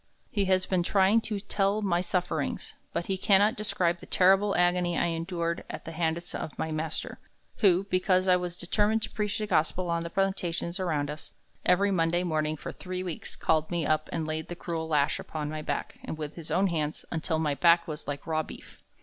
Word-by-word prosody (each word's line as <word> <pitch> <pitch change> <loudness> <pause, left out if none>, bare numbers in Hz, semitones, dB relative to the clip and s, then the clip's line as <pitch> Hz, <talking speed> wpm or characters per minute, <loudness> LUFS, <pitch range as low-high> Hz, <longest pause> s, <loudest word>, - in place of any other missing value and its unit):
He 205 -5 +1
has 185 0 +2
been 185 -2 +1
trying 195 +5 +4
to 215 -2 -3
tell 200 +1 0
my 175 -3 +2
sufferings, 180 -5 -2 0.2
but 170 0 -2
he 190 -1 -2
cannot 205 +3 +4
describe 180 -6 0
the - - -12
terrible 195 +2 +4
agony 175 -1 +2
I - - +2
endured 170 0 -2
at - - -7
the 165 - -6
hands 165 +1 -1
of 155 - -5
my 160 - -2
master, 155 0 -3 0.4
who, 190 -3 +4
because 185 -1 +2
I 180 - +6
was 180 -1 -3
determined 210 +5 +1
to - - -2
preach 210 -1 -1
the 215 - -1
gospel 175 -1 +1
on 170 0 0
the 170 - -4
plantations 180 -1 -1
around 150 -6 0
us, 150 - -9 0.3
every 200 +3 +4
Monday 175 -1 +2
morning 155 -2 0
for - - -6
three 185 0 -5
weeks 175 -4 -5
called 155 -1 +1
me 170 -3 -1
up 155 0 +1
and 160 -1 -2
laid 155 0 -3
the 175 - -6
cruel 165 -2 -4
lash 150 -2 +2
upon 150 -1 -4
my 155 0 -4
back 145 -1 -4 0.2
with 150 -1 -5
his 165 -2 -9
own 195 - +2
hands 155 -4 -1
until 160 -1 -1
my 155 -2 +1
back 170 +3 +4
was 150 -2 -6
like 145 -1 -4
raw 155 -1 +1
beef. - - -12
175 Hz, 205 wpm, -28 LUFS, 160-190 Hz, 0.4 s, I